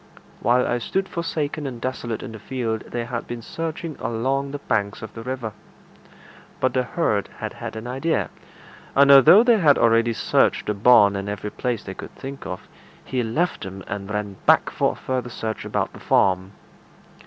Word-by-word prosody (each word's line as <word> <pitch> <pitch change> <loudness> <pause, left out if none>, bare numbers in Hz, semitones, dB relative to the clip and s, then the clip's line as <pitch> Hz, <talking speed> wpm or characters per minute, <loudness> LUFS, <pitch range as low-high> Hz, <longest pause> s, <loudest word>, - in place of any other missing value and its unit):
While 125 +3 +3
I 120 - 0
stood 190 - -1
forsaken 155 -4 -3
and 125 -3 -6
desolate 120 -3 -4
in 130 - -7
the 110 - -9
field, 115 -2 -3
they 120 -1 -3
had 120 -1 -5
been 120 -1 -6
searching 165 +1 -5
along 135 +4 -1
the 145 - -4
banks 100 -8 -2
of 110 - -8
the 115 - -8
river. 125 -3 -4 1.1
But 130 -1 +1
the 130 - +2
herd 125 -6 -1
had - - -5
had - - -7
an 110 +1 -6
idea, 135 +7 -1 0.6
and 140 0 +6
although 140 - +9
they 240 -3 +4
had 150 -6 +5
already 115 0 +3
searched - - +2
the 105 - 0
barn 100 -1 +6
and 100 +1 -3
every 105 0 -4
place 120 -4 -2
they 95 - -6
could - - -10
think 135 +1 -8
of, 90 - -7 0.4
he 130 -1 -1
left 135 +11 -1
them 95 0 -7
and 100 0 -5
ran 105 -2 -3
back - - +5
for - - +1
a - - -12
further 125 -2 -3
search 110 -2 -4
about - - -2
the - - -11
farm. 95 +1 +2
120 Hz, 190 wpm, -23 LUFS, 105-135 Hz, 1.1 s, although